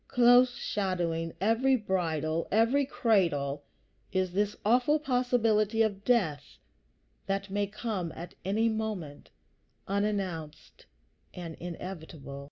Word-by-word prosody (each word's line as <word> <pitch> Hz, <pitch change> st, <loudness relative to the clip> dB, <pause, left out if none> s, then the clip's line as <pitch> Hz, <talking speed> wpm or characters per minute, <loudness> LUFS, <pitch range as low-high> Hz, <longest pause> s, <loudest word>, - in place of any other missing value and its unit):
Close 245 Hz, +1 st, +5 dB
shadowing 175 Hz, -4 st, -2 dB
every 230 Hz, +7 st, +3 dB
bridal, 165 Hz, -, -1 dB
every 235 Hz, +6 st, +3 dB
cradle, 155 Hz, -, +1 dB, 0.5 s
is 185 Hz, -1 st, 0 dB
this 205 Hz, +2 st, 0 dB
awful 250 Hz, +7 st, +4 dB
possibility 235 Hz, -5 st, +2 dB
of 200 Hz, -2 st, -2 dB
death 160 Hz, -, 0 dB, 0.7 s
that 195 Hz, 0 st, -2 dB
may 205 Hz, 0 st, 0 dB
come 210 Hz, -5 st, -3 dB
at 170 Hz, +2 st, -8 dB
any 215 Hz, +4 st, +1 dB
moment, 215 Hz, -10 st, -4 dB, 0.6 s
unannounced 195 Hz, -6 st, -3 dB, 0.5 s
and 170 Hz, -2 st, -6 dB
inevitable. 160 Hz, -5 st, -7 dB
200 Hz, 100 wpm, -29 LUFS, 170-225 Hz, 0.7 s, Close